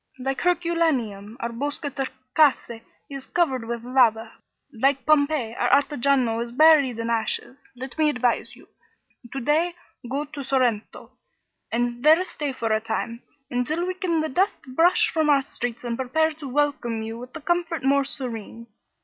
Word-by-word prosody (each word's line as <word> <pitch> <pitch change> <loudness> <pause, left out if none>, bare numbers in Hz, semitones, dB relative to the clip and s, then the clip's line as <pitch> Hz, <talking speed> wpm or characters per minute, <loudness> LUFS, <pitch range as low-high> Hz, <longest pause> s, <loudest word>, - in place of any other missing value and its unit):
Like 265 +1 -3
Herculaneum, 315 - 0
our 235 - -2
Boscatrecase 270 -1 -1 0.3
is 275 -2 -8
covered 265 -9 0
with 235 0 -4
lava; 235 -3 +2 0.4
like 270 +3 +1
Pompeii 285 -6 +2
our - - 0
Ottajano 265 -5 0
is 235 - -9
buried 285 -3 +5
in 230 0 -2
ashes. 230 +4 -2
Let 260 +2 -8
me 305 -1 +4
advise 250 -4 -1
you. - - -18 0.6
To 270 - -4
day 320 +7 +1 0.3
go 280 +3 -2
to 285 -1 -8
Sorrento, 250 -5 -1 0.6
and 240 +1 -1
there 315 +4 +6
stay 295 -6 -4
for 230 -4 -3
a 215 0 +2
time, 230 +2 -3 0.3
until 285 +8 -1
we 370 - -2
can 360 -4 -1
the 315 - -2
dust 380 +9 0
brush 365 +8 +4
from 315 -2 +1
our 280 -2 +4
streets 245 -3 -5
and 240 -1 -2
prepare 315 +6 +1
to 300 -2 -9
welcome 260 -5 0
you 225 +1 -6
with 250 +1 -10
the 325 - -8
comfort 335 0 -1
more 280 +1 +3
serene. 230 -5 -7
270 Hz, 160 wpm, -24 LUFS, 235-310 Hz, 0.6 s, there